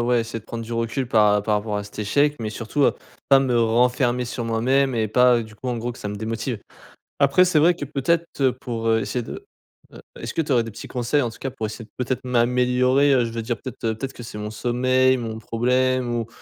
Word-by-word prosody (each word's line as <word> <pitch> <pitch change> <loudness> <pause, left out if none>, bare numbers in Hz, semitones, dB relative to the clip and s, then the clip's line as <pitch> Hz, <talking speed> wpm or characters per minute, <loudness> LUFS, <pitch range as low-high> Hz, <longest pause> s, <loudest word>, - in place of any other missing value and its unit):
ouais, 120 0 +2
essayer 115 0 -5
de - - -24
prendre 115 0 -6
du 120 - -7
recul 115 +3 -1
par 105 -2 +4
par 105 - +1
rapport 105 0 -1
à 105 - -3
cet 105 - -8
échec, 145 +8 +2
mais 110 -1 -3
surtout, 115 +6 -2
heu, - - +4 0.4
pas 135 -1 +7
me 125 -3 +1
renfermer 125 +2 +2
sur 120 0 -4
moi-même 130 +4 +1
et 110 - +1
pas, 125 +2 +5
heu, 115 - -3
du 110 - -14
coup 130 - -6
en 120 - -1
gros 120 +2 -3
que - - -14
ça 105 - -5
me 105 - -5
démotive. 115 +2 -3 0.6
Après 140 +6 +5
c'est 165 -4 +3
vrai 170 +4 +5
que 145 - -6
peut-être, 165 +4 0
heu, 130 -2 +4
pour, 115 -2 -4
heu, 110 0 +3
essayer 125 +3 -2
de 400 - -8 0.5
heu, - - -12 0.2
est-ce - - -5
que 165 - +1
tu 145 -3 -2
aurais 120 - +4
des 115 - -7
petits - - -9
conseils 125 +3 0
en 120 - -1
tout 115 - -14
cas 135 - -4
pour 110 -4 -4
essayer 110 +1 -8
peut-être 125 0 -2
m'améliorer, 125 +3 +3
heu, 125 - +3
je 115 - -4
veux 115 - -3
dire 120 +1 -2
peut-être, 130 - -8
heu, 110 -1 +1
peut-être 135 +2 -4
que 120 - -10
c'est 110 -2 -8
mon 105 0 -5
sommeil, 130 +3 +2
mon 115 -3 -5
problème 125 +2 0
ou 115 -1 -2
120 Hz, 255 wpm, -23 LUFS, 115-130 Hz, 0.6 s, pas